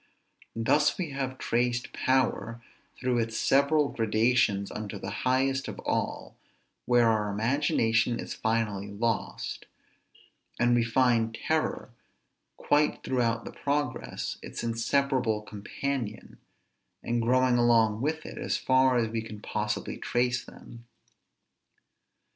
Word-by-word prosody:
Thus 145 +6 +2
we 175 -6 -3
have 135 -1 -3
traced 120 -1 -1
power 120 -3 0 0.4
through 125 -2 0
its 115 0 -2
several 140 +2 +3
gradations 110 -2 +1
unto 105 -2 -5
the - - -6 0.2
highest 135 +1 +1
of - - -6
all, - - -2 0.5
where 120 -1 +5
our 110 -2 +1
imagination 115 0 +1
is - - -5
finally 110 -3 -1
lost; 110 +2 -3 0.9
and 120 0 +3
we 120 -1 +3
find 115 -1 +2
terror, 155 -5 -1 0.7
quite 150 +1 +1
throughout 115 -3 0
the - - -6
progress, 145 +1 -2
its - - -7
inseparable 115 -1 0
companion, 110 +2 -5 0.6
and 120 0 0
growing 125 +1 +3
along 115 -2 +3
with 155 +3 -2
it, - - -8
as - - -1
far 130 -1 +3
as 115 -2 +2
we 110 0 -3
can 110 -1 -9
possibly - - -3
trace 120 0 0
them. 115 0 -13
120 Hz, 120 wpm, -28 LUFS, 115-130 Hz, 0.9 s, where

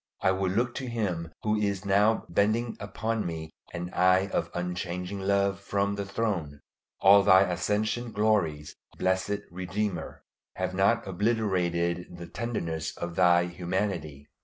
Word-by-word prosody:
I 95 - +5
would 95 -1 0
look 120 +3 +1
to 130 - -4
Him 90 -8 -2
who 110 0 +1
is 100 -2 -1
now 105 +3 +3
bending 110 +6 +1
upon 110 +2 -2
me 80 -2 -5 0.2
an 90 +1 -5
eye 95 +2 +4
of - - -1
unchanging 90 +2 -3
love 100 0 +1
from 100 0 -1
the 100 -1 -4
throne. 95 -9 -2 0.4
All 100 +1 +8
Thy 95 -1 +7
ascension 105 +6 -1
glories, 85 -10 0 0.2
blessed 95 +2 0
Redeemer, 95 +2 -3 0.3
have - - -2
not 100 +5 +2
obliterated 90 -4 0
the 85 - -7
tenderness 85 -7 -4
of 85 -1 -5
Thy 90 -1 +5
humanity. 85 -5 -3
95 Hz, 135 wpm, -28 LUFS, 85-105 Hz, 0.4 s, All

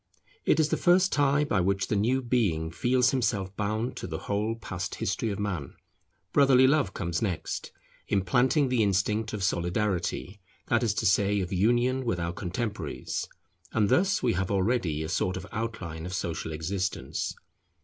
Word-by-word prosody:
It 160 - +3
is 155 -1 +3
the - - +1
first 185 +1 +4
tie 145 0 +3
by 105 -10 +1
which 95 +2 +1
the - - -1
new 125 +6 +1
being 100 -10 0
feels 125 +6 +2
himself 100 -7 -1
bound 110 +4 -2
to - - -5
the 80 -2 -4
whole 105 +5 -1
past 90 -5 -5
history 115 - -1
of 100 - -3
Man. 90 -10 -3 0.6
Brotherly 135 -2 +6
love 145 +2 +2
comes 85 -3 -2
next, 95 -7 -3 0.4
implanting 125 - +2
the 125 -2 +2
instinct 105 +2 +1
of 105 -3 -4
Solidarity, 95 +2 -1 0.3
that 120 +1 +3
is 110 -3 +1
to 110 - -1
say 100 0 +3
of 95 0 -3
union 120 +7 +2
with 115 -8 -1
our 85 0 -2
contemporaries; 95 - -4 0.5
and 105 -3 +2
thus 195 -1 +2
we 120 -2 +3
have 95 +1 -1
already 95 -6 0
a - - -4
sort 95 +1 -1
of - - -7
outline 95 -8 -4
of 90 - -4
social 85 -2 -3
existence. 90 +5 -3
105 Hz, 170 wpm, -28 LUFS, 90-120 Hz, 0.6 s, Brotherly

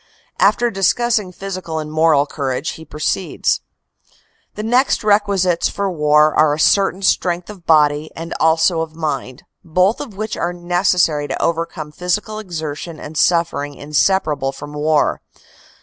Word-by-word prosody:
After 240 -1 +3
discussing 210 +1 +1
physical 185 -3 -6
and 155 -1 -4
moral 155 -2 +3
courage, 140 0 -3
he 160 - -10
proceeds: 155 +5 -1 0.9
"The 210 - -5
next 245 +4 +2
requisites 200 -4 +2
for 200 -1 -2
war 150 -1 +3
are 150 -1 +3
a - - -8
certain 195 +3 +2
strength 180 0 0
of 185 -5 -15
body 150 -1 +3
and 165 +1 -6
also 160 +1 +3
of 160 -1 -6
mind, 140 -5 -4 0.2
both 185 - +1
of 230 -9 -9
which 215 +1 -3
are 175 +1 -2
necessary 175 -4 +1
to - - -4
overcome 165 -2 -2
the - - -27
physical 210 +4 -2
exertion 160 -4 -6
and 150 +1 -9
suffering 160 -4 +1
inseparable 150 -1 0
from 145 +2 -10
war. 150 0 +1
165 Hz, 145 wpm, -18 LUFS, 150-190 Hz, 0.9 s, After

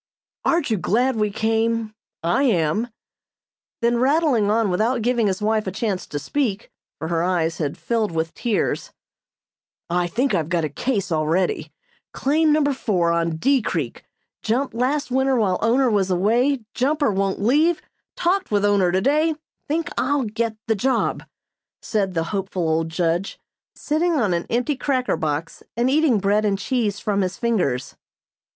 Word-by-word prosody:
"Aren't 335 -7 +1
you 220 - +2
glad 240 +7 +1
we 210 -1 +1
came? 225 +1 0 0.3
I 200 +11 +2
am." 210 - +1 1.0
Then 235 0 +2
rattling 265 -5 +2
on 220 -2 +2
without 225 +6 +1
giving 240 -2 +2
his 190 +1 -2
wife 215 -1 +1
a - - -1
chance 200 -1 -2
to 145 - -4
speak, 220 - -2 0.3
for 160 - -5
her 165 -1 0
eyes 170 -2 0
had 145 -3 -2
filled 225 -4 -1
with 165 0 -2
tears: 240 - -1 1.0
"I 175 0 +1
think 250 +10 0
I've 160 -1 0
got 170 -2 +1
a - - -3
'case' 200 - -2
already. 160 0 0 0.4
Claim 305 +3 +2
number 295 -2 +3
four 180 -9 0
on 170 -1 0
D. 270 - +2
Creek 155 - -3 0.4
jumped 250 +5 -1
last 260 +4 -1
winter 265 +1 +2
while 200 -6 +1
owner 250 +4 +3
was 200 -4 +1
away 235 +9 +2
jumper 285 0 +1
won't 195 0 -1
leave 300 +11 +3 0.4
talked 375 +2 0
with 205 -1 +2
owner 200 -3 +3
today 295 - +2 0.3
think 320 +2 -1
I'll 285 -1 +1
get 220 0 -2
the 225 - +2
job," 255 +6 0 0.5
said 200 -5 -1
the 165 - +1
hopeful 190 -3 -2
old 160 +1 0
judge, 170 +3 -1 0.4
sitting 330 +3 0
on 215 - +1
an 170 0 -2
empty 250 +5 0
cracker 260 -1 0
box 155 +1 -3 0.2
and 245 +2 +2
eating 295 -5 +3
bread 205 +2 +2
and 200 -2 +1
cheese 210 -3 -1
from 200 -1 0
his 185 0 -2
fingers. 180 - -1
215 Hz, 160 wpm, -22 LUFS, 180-260 Hz, 1.0 s, number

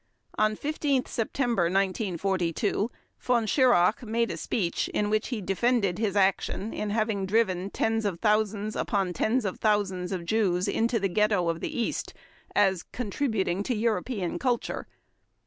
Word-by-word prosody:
On 215 0 +2
15 285 -1 0
September 235 -4 0
1942 190 +1 0 0.3
Von 240 -3 +1
Schirach 220 -5 +4
made 230 0 0
a - - -3
speech 180 -7 -1
in 210 0 -1
which 215 +1 +1
he 240 -5 -3
defended 200 0 +1
his 210 -3 0
action 195 +2 +1
in 210 - -3
having 215 -2 0
driven 190 -3 +1
"tens 225 +2 0
of 195 -5 -2
thousands 215 0 +1
upon 195 -5 0
tens 220 +7 +1
of 190 - -3
thousands 195 -4 0
of 180 -3 -3
Jews 185 -2 +1
into 230 +1 +1
the 195 - +1
ghetto 200 -2 +2
of 165 0 -1
the - - -4
East" 235 - -2 0.4
as 190 -3 +3
"contributing 215 -6 -2
to 245 +4 -1
European 215 -3 -1
culture". 250 -3 -1
210 Hz, 145 wpm, -27 LUFS, 190-230 Hz, 0.4 s, Schirach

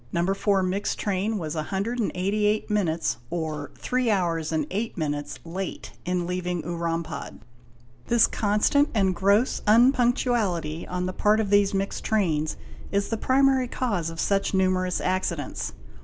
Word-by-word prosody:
"No. 175 +3 +1
4 195 -1 +1
mixed 190 +3 -1
train 205 +2 -1
was 155 -5 -4
188 205 +3 -1
minutes, 170 -9 0
or 155 -4 -3
three 255 -1 0
hours 170 -6 0
and 155 -2 0
eight 215 +3 -3
minutes, 145 -2 -3
late 185 +2 -5
in 180 -1 0
leaving 180 -1 -2
Urampad. 170 -1 -4 0.7
This 235 -1 +5
constant 215 +8 +2
and 195 -3 +3
gross 200 +7 +2
unpunctuality 230 - +2
on 180 0 -2
the 185 - -3
part 210 +3 +3
of 205 -2 -1
these 205 -1 +4
mixed 195 0 -2
trains 160 -8 0 0.3
is 200 0 0
the 225 - 0
primary 265 +1 +3
cause 200 -10 -1
of 165 0 -8
such 195 -1 +1
numerous 185 -1 +1
accidents. 180 -5 -2
190 Hz, 140 wpm, -25 LUFS, 170-210 Hz, 0.7 s, This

